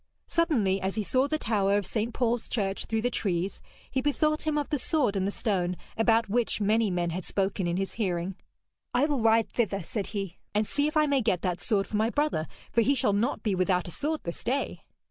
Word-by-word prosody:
Suddenly, 230 Hz, -, +1 dB
as 190 Hz, 0 st, -1 dB
he 215 Hz, -, 0 dB
saw 260 Hz, +6 st, +2 dB
the 310 Hz, -, 0 dB
tower 205 Hz, -6 st, +1 dB
of 205 Hz, -, -1 dB
St. 225 Hz, +4 st, -2 dB
Paul's 240 Hz, -1 st, 0 dB
church 195 Hz, -4 st, -1 dB
through 225 Hz, -1 st, -1 dB
the 245 Hz, -, +1 dB
trees, 190 Hz, -3 st, -1 dB, 0.3 s
he 260 Hz, -, 0 dB
bethought 305 Hz, +2 st, +1 dB
him 305 Hz, -1 st, +1 dB
of 290 Hz, -, 0 dB
the 295 Hz, -3 st, 0 dB
sword 255 Hz, -6 st, +1 dB
in 190 Hz, -1 st, +1 dB
the 200 Hz, -, 0 dB
stone, 180 Hz, -5 st, -1 dB, 0.2 s
about 225 Hz, 0 st, +3 dB
which 230 Hz, +3 st, +1 dB
many 215 Hz, +1 st, +2 dB
men 175 Hz, -2 st, 0 dB
had 180 Hz, +2 st, -3 dB
spoken 195 Hz, -1 st, -1 dB
in 170 Hz, +1 st, 0 dB
his 195 Hz, 0 st, -2 dB
hearing. 180 Hz, -1 st, -1 dB, 0.6 s
'I 255 Hz, +4 st, +4 dB
will 290 Hz, -5 st, 0 dB
ride 225 Hz, 0 st, +3 dB
thither,' 200 Hz, -5 st, 0 dB
said 200 Hz, +4 st, -2 dB
he, 195 Hz, -4 st, -4 dB, 0.2 s
'and 210 Hz, +1 st, +3 dB
see 285 Hz, +6 st, 0 dB
if 305 Hz, -, -1 dB
I 305 Hz, -, +5 dB
may 280 Hz, -2 st, +2 dB
get 210 Hz, -6 st, 0 dB
that 180 Hz, -1 st, -1 dB
sword 200 Hz, -3 st, +1 dB
for 210 Hz, -, -2 dB
my 220 Hz, +2 st, +2 dB
brother, 290 Hz, -, 0 dB, 0.2 s
for 230 Hz, -, +3 dB
he 275 Hz, +5 st, +3 dB
shall 210 Hz, -5 st, +2 dB
not 225 Hz, +7 st, 0 dB
be 210 Hz, -, +1 dB
without 185 Hz, -1 st, +1 dB
a -, -, -5 dB
sword 305 Hz, -, -2 dB
this 170 Hz, -, -5 dB
day.' 265 Hz, +4 st, -1 dB
215 Hz, 230 wpm, -28 LUFS, 195-255 Hz, 0.6 s, I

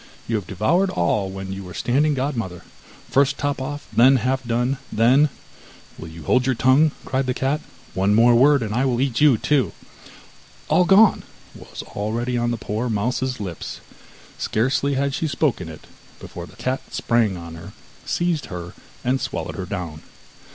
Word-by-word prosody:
You 115 Hz, -, 0 dB
have 100 Hz, -5 st, -6 dB
devoured 165 Hz, -, +1 dB
all 95 Hz, -, 0 dB
when 95 Hz, 0 st, -6 dB
you 95 Hz, 0 st, -6 dB
were 90 Hz, -2 st, -10 dB
standing 145 Hz, +4 st, +1 dB
godmother. 115 Hz, -, -3 dB, 0.5 s
First 140 Hz, 0 st, +3 dB
top 145 Hz, -1 st, -2 dB
off, 145 Hz, +2 st, -5 dB
then 130 Hz, +4 st, +7 dB
half 130 Hz, +1 st, 0 dB
done, 120 Hz, +3 st, 0 dB
then 130 Hz, +7 st, +4 dB, 0.3 s
' -, -, -22 dB
'Will 80 Hz, -, -7 dB
you 80 Hz, 0 st, -10 dB
hold 130 Hz, -, +2 dB
your 130 Hz, -, +2 dB
tongue,' 130 Hz, +6 st, +4 dB
cried 130 Hz, -1 st, -1 dB
the 125 Hz, -, 0 dB
cat, 135 Hz, +3 st, 0 dB, 0.3 s
'one 100 Hz, +3 st, +2 dB
word 120 Hz, +1 st, +6 dB
more, 140 Hz, +5 st, +6 dB
and 115 Hz, -6 st, -2 dB
I 125 Hz, +4 st, +1 dB
will 125 Hz, -3 st, +1 dB
eat 130 Hz, 0 st, 0 dB
you 145 Hz, -6 st, +6 dB
too.' 140 Hz, +2 st, +1 dB, 1.0 s
'All 180 Hz, -, +4 dB
gone' 200 Hz, +3 st, +6 dB, 0.3 s
was -, -, -9 dB
already 115 Hz, +4 st, -3 dB
on 120 Hz, 0 st, 0 dB
the 120 Hz, -, -1 dB
poor 110 Hz, +3 st, -3 dB
mouse's 125 Hz, +4 st, -1 dB
lips; 90 Hz, -5 st, -6 dB, 0.6 s
scarcely 135 Hz, +5 st, 0 dB
had 140 Hz, +1 st, 0 dB
she 160 Hz, +2 st, -1 dB
spoken 130 Hz, -, -1 dB
it 80 Hz, -, -11 dB, 0.3 s
before -, -, -8 dB
the -, -, -16 dB
cat 130 Hz, +1 st, -2 dB
sprang 115 Hz, -5 st, +1 dB
on 85 Hz, -1 st, -9 dB
her, 85 Hz, +4 st, -10 dB, 0.3 s
seized 170 Hz, -5 st, -1 dB
her, 90 Hz, -2 st, -7 dB, 0.3 s
and 130 Hz, +2 st, 0 dB
swallowed -, -, -4 dB
her 95 Hz, -2 st, -5 dB
down. 90 Hz, -6 st, -5 dB
125 Hz, 175 wpm, -22 LUFS, 100-135 Hz, 1.0 s, then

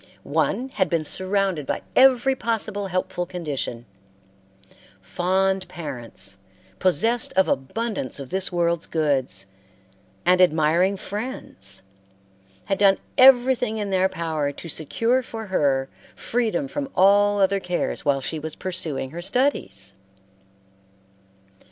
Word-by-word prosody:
One 260 Hz, +2 st, 0 dB
had 190 Hz, -8 st, 0 dB
been 165 Hz, -1 st, 0 dB
surrounded 190 Hz, -2 st, 0 dB
by -, -, -2 dB
every 265 Hz, 0 st, +5 dB
possible 215 Hz, -4 st, -2 dB
helpful 180 Hz, -1 st, -2 dB
condition. 145 Hz, -9 st, -4 dB, 1.1 s
Fond 190 Hz, -, 0 dB
parents, 120 Hz, -, -6 dB, 0.4 s
possessed 225 Hz, +7 st, +2 dB
of 190 Hz, 0 st, +3 dB
abundance 150 Hz, -, -2 dB
of 135 Hz, -2 st, -8 dB
this 190 Hz, 0 st, +1 dB
world's 170 Hz, -1 st, 0 dB
goods, 135 Hz, -, 0 dB, 0.8 s
and 180 Hz, +1 st, +4 dB
admiring 175 Hz, +3 st, +3 dB
friends, 200 Hz, -, -5 dB, 0.8 s
had 195 Hz, -, -1 dB
done 195 Hz, -1 st, +5 dB, 0.2 s
everything 250 Hz, -3 st, +5 dB
in 205 Hz, -2 st, -3 dB
their 190 Hz, 0 st, +3 dB
power 160 Hz, -5 st, -2 dB
to 155 Hz, -, -10 dB
secure 230 Hz, -, 0 dB
for 225 Hz, -2 st, -7 dB
her 140 Hz, -8 st, +1 dB, 0.3 s
freedom 245 Hz, +3 st, -1 dB
from 275 Hz, 0 st, -4 dB
all 205 Hz, +2 st, +4 dB
other 195 Hz, 0 st, +3 dB
cares 180 Hz, -2 st, -2 dB
while 140 Hz, -1 st, +1 dB
she 155 Hz, +4 st, -3 dB
was 155 Hz, 0 st, -5 dB
pursuing 160 Hz, -8 st, -3 dB
her 170 Hz, +2 st, -6 dB
studies. 100 Hz, -, -1 dB
185 Hz, 115 wpm, -23 LUFS, 150-210 Hz, 1.1 s, every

